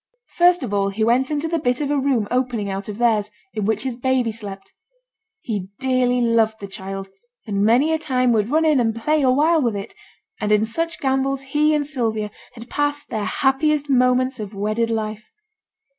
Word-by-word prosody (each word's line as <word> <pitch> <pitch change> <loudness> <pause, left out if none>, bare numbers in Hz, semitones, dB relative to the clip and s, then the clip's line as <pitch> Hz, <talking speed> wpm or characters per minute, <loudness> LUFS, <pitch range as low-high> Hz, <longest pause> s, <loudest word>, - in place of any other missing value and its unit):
First 350 -2 +4
of 220 -5 -4
all 200 -1 +1
he 210 +3 -2
went 245 +4 +2
into 300 +1 -1
the 330 0 -1
bit 250 -4 0
of 290 -1 -1
a 290 - +2
room 260 -6 +1
opening 245 -5 -1
out 195 +2 -5
of 210 - -5
theirs, 225 -3 +2 0.2
in 210 - -2
which 215 +1 0
his 260 -3 -3
baby 255 -1 0
slept. 205 -3 -8 0.7
He 205 -5 -4
dearly 255 -1 +1
loved 225 -2 +2
the 200 - -6
child, 195 -1 -7 0.4
and 200 -3 -1
many 250 +9 +4
a 320 - 0
time 255 -5 +1
would 215 -1 +1
run 315 +3 +2
in 305 -4 +4
and 225 -2 +1
play 300 +7 +1
a 265 - +3
while 310 +5 +3
with 235 -5 0
it; 200 - -6 0.5
and 210 -1 -1
in 210 +1 +4
such 330 +8 -2
gambols 270 0 0
he 300 +3 +2
and 295 -1 0
Sylvia 225 -7 -2 0.2
had 230 0 -11
passed 290 +1 -2
their 215 -2 -2
happiest 285 +2 +1
moments 255 0 +2
of 210 -1 -6
wedded 215 +3 -1
life. 215 -1 -3
245 Hz, 200 wpm, -21 LUFS, 215-275 Hz, 0.7 s, First